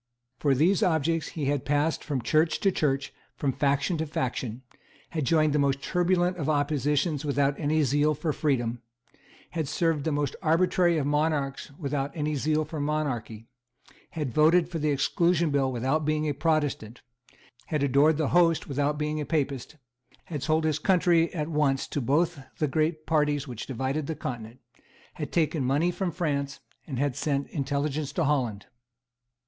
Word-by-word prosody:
For 140 Hz, -3 st, +2 dB
these 170 Hz, +8 st, +3 dB
objects 165 Hz, -1 st, +1 dB
he 150 Hz, -, -1 dB
had 140 Hz, -1 st, 0 dB
passed 145 Hz, +3 st, 0 dB
from 135 Hz, -5 st, -3 dB
Church 155 Hz, +5 st, +2 dB
to 195 Hz, -, +3 dB
Church 135 Hz, -5 st, 0 dB
and -, -, -34 dB
from 140 Hz, -, 0 dB
faction 140 Hz, +5 st, +1 dB
to 160 Hz, -, -1 dB
faction, 125 Hz, -3 st, -3 dB, 0.5 s
had 155 Hz, -4 st, -2 dB
joined 155 Hz, 0 st, +3 dB
the 150 Hz, -, +2 dB
most 140 Hz, -1 st, +2 dB
turbulent 180 Hz, 0 st, +1 dB
of 155 Hz, -3 st, -2 dB
oppositions 145 Hz, +1 st, +1 dB
without 140 Hz, -1 st, +1 dB
any 155 Hz, 0 st, +2 dB
zeal 145 Hz, +2 st, +2 dB
for 150 Hz, +1 st, -2 dB
freedom, 120 Hz, -6 st, -1 dB, 0.3 s
and -, -, -32 dB, 0.3 s
had 160 Hz, -4 st, -2 dB
served 160 Hz, 0 st, 0 dB
the 160 Hz, -, 0 dB
most 145 Hz, -2 st, -1 dB
arbitrary 175 Hz, +1 st, +3 dB
of 145 Hz, -, 0 dB
monarchs 150 Hz, -2 st, 0 dB
without 140 Hz, -2 st, -2 dB
any 150 Hz, -1 st, -1 dB
zeal 155 Hz, +2 st, 0 dB
for 155 Hz, +1 st, -6 dB
monarchy; 140 Hz, -7 st, -2 dB, 0.7 s
had 150 Hz, -7 st, -3 dB
voted 165 Hz, +2 st, +4 dB
for 170 Hz, -2 st, -4 dB
the 150 Hz, 0 st, 0 dB
Exclusion 170 Hz, +3 st, +2 dB
Bill 135 Hz, -2 st, +1 dB
without 130 Hz, +6 st, 0 dB
being 155 Hz, 0 st, 0 dB
a 145 Hz, -, 0 dB
Protestant, 145 Hz, -7 st, -1 dB, 0.3 s
and -, -, -28 dB, 0.3 s
had 150 Hz, -3 st, -1 dB
adored 140 Hz, +3 st, +4 dB
the 155 Hz, -3 st, 0 dB
Host 170 Hz, -2 st, +3 dB
without 145 Hz, +1 st, 0 dB
being 150 Hz, 0 st, -2 dB
a -, -, -3 dB
Papist; 145 Hz, -3 st, -2 dB, 0.5 s
had 150 Hz, -5 st, -5 dB
sold 155 Hz, +2 st, +1 dB
his 155 Hz, -1 st, 0 dB
country 170 Hz, -2 st, +3 dB
at 155 Hz, -4 st, -3 dB
once 150 Hz, -4 st, +1 dB
to 145 Hz, -, -2 dB
both 160 Hz, +6 st, +1 dB, 0.2 s
the 150 Hz, -, +1 dB
great 155 Hz, +2 st, 0 dB
parties 150 Hz, -2 st, +1 dB
which 120 Hz, -4 st, -7 dB
divided 135 Hz, +3 st, -2 dB
the 160 Hz, -, -3 dB
Continent; 120 Hz, -3 st, -6 dB, 0.5 s
had 150 Hz, -4 st, -6 dB
taken 160 Hz, -3 st, +1 dB
money 145 Hz, +7 st, +2 dB
from 185 Hz, +1 st, -2 dB
France, 145 Hz, -5 st, -2 dB, 0.3 s
and 135 Hz, -5 st, -4 dB
had 140 Hz, -1 st, 0 dB
sent 140 Hz, -2 st, -1 dB
intelligence 145 Hz, 0 st, -2 dB
to 170 Hz, -, -1 dB
Holland. 125 Hz, -9 st, 0 dB
150 Hz, 175 wpm, -27 LUFS, 140-160 Hz, 0.7 s, voted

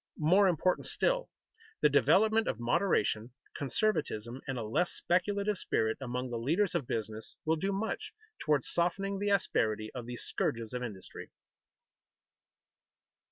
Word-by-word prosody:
More 185 Hz, +6 st, +5 dB
important 180 Hz, +1 st, +1 dB
still, -, -, 0 dB, 0.5 s
the -, -, +7 dB
development 220 Hz, +2 st, +4 dB
of 115 Hz, -, -1 dB
moderation, 120 Hz, -, +1 dB, 0.2 s
conservatism, 135 Hz, -, -1 dB
and 135 Hz, -1 st, -2 dB
a 115 Hz, -, -2 dB
less 150 Hz, +12 st, +1 dB
speculative 200 Hz, +3 st, 0 dB
spirit 110 Hz, 0 st, 0 dB
among 125 Hz, 0 st, -3 dB
the 120 Hz, -, -2 dB
leaders 170 Hz, -, +1 dB
of 130 Hz, -, -1 dB
business 110 Hz, 0 st, -4 dB
will 160 Hz, +1 st, +3 dB
do 195 Hz, +5 st, -1 dB
much 220 Hz, -, -3 dB, 0.3 s
toward 150 Hz, -4 st, +2 dB
softening 195 Hz, +3 st, 0 dB
the 205 Hz, 0 st, 0 dB
asperity 110 Hz, -, +1 dB
of 120 Hz, -2 st, -6 dB
these 120 Hz, 0 st, -5 dB
scourges 115 Hz, 0 st, -2 dB
of 125 Hz, -, -3 dB
industry. 105 Hz, -6 st, -7 dB
150 Hz, 135 wpm, -31 LUFS, 120-195 Hz, 0.5 s, the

